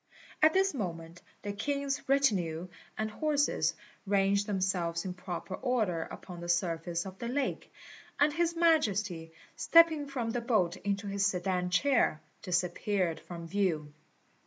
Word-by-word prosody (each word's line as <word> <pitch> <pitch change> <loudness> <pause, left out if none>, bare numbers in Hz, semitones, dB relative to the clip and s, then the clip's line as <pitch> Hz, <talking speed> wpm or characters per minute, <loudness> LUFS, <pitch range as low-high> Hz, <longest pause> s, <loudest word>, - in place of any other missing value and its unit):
At 310 +1 +6
this 385 -1 +3
moment 170 - -5 0.2
the 205 0 -3
king's 280 +5 -2
retinue 185 -11 +1 0.3
and 215 0 -2
horses 295 +4 +1 0.3
ranged 200 0 +2
themselves 185 -4 -1
in 185 - -3
proper 180 0 -6
order 220 -8 0
upon 180 -2 -9
the 175 - -6
surface 170 0 0
of 190 0 -9
the 235 - -4
lake; 265 +2 -2 0.5
and 295 +1 +4
His 340 +1 +1
Majesty, 210 - +1 0.2
stepping 325 -3 +5
from 250 -5 -3
the 245 +1 -2
boat 210 -8 +1
into 200 +1 -2
his 200 0 -1
sedan 180 -1 -1
chair, 230 - +2 0.2
disappeared 180 0 0
from 170 -1 -8
view. 165 -5 -1
200 Hz, 135 wpm, -31 LUFS, 175-265 Hz, 0.5 s, At